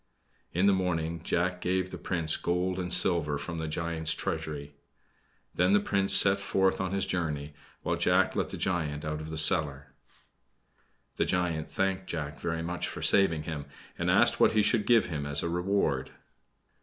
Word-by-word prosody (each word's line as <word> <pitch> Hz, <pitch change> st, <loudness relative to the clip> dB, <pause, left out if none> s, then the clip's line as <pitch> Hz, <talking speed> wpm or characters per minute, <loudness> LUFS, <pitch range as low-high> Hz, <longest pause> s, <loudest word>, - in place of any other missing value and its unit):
In 90 Hz, +3 st, +1 dB
the 100 Hz, -, +5 dB
morning 85 Hz, -3 st, -2 dB
Jack 90 Hz, +2 st, -1 dB
gave 95 Hz, 0 st, -1 dB
the -, -, -6 dB
Prince 85 Hz, -4 st, 0 dB
gold 90 Hz, +1 st, -1 dB
and 90 Hz, -1 st, -4 dB
silver 80 Hz, -6 st, +1 dB
from 85 Hz, +3 st, -6 dB
the 80 Hz, -, -3 dB
giant's 80 Hz, 0 st, -1 dB
treasury. 75 Hz, -2 st, -4 dB, 0.8 s
Then 90 Hz, +2 st, +2 dB
the 105 Hz, -, +5 dB
Prince 100 Hz, -1 st, +2 dB
set 100 Hz, 0 st, +6 dB
forth 95 Hz, -1 st, 0 dB
on 95 Hz, -1 st, -2 dB
his 100 Hz, 0 st, 0 dB
journey, 75 Hz, -4 st, -3 dB, 0.3 s
while -, -, -1 dB
Jack -, -, +2 dB
let -, -, -1 dB
the -, -, -6 dB
giant 75 Hz, -6 st, -2 dB
out 75 Hz, 0 st, -3 dB
of 80 Hz, -, -8 dB
the 80 Hz, -, -5 dB
cellar. 70 Hz, -3 st, +2 dB, 1.2 s
The -, -, +1 dB
giant 85 Hz, -3 st, -1 dB
thanked 95 Hz, -1 st, -1 dB
Jack 75 Hz, -3 st, -5 dB
very 85 Hz, -1 st, -3 dB
much 85 Hz, +1 st, -3 dB
for -, -, -7 dB
saving 85 Hz, -6 st, +3 dB
him, 75 Hz, -2 st, -6 dB, 0.3 s
and -, -, -2 dB
asked -, -, +4 dB
what -, -, +4 dB
he 110 Hz, -1 st, +3 dB
should 105 Hz, 0 st, +1 dB
give 120 Hz, -2 st, +5 dB
him 75 Hz, -4 st, -4 dB
as 70 Hz, 0 st, 0 dB
a 85 Hz, -, -2 dB
reward? 90 Hz, -6 st, -1 dB
85 Hz, 180 wpm, -28 LUFS, 80-95 Hz, 1.2 s, set